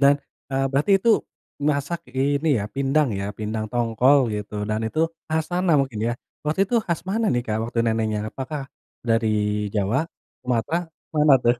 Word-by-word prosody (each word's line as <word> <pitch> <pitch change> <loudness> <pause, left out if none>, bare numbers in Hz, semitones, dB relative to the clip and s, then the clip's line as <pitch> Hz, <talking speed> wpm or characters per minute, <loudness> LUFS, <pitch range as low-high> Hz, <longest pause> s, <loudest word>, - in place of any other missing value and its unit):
Dan, 140 +1 +7 0.4
eee, 135 0 +1
berarti 145 +8 +1
itu 230 +5 0 0.6
masak 150 +4 -2 0.2
ini 140 +3 +2
ya, 100 - -2
pindang 140 +1 +2
ya, 100 - -2
pindang 110 0 -2
tongkol 120 +4 +4
gitu 105 0 -5 0.2
dan 110 0 0
itu 155 +8 -1 0.3
khas 160 0 0
sana 175 -1 +2
mungkin 130 -6 -3
ya. 120 - +1 0.3
Waktu 155 +5 0
itu - - +1
khas 170 -3 0
mana 220 +2 +1
nih 120 - +1
Kak 110 0 0
waktu 120 - -4
neneknya, 110 -2 +1
apakah 135 +2 -5 0.5
dari 115 0 +3 0.5
Jawa, 110 +10 +1 0.3
Sumatera, 130 +8 0 0.3
mana 150 -2 +6
tuh? 120 +1 +5
135 Hz, 165 wpm, -24 LUFS, 115-155 Hz, 0.6 s, Dan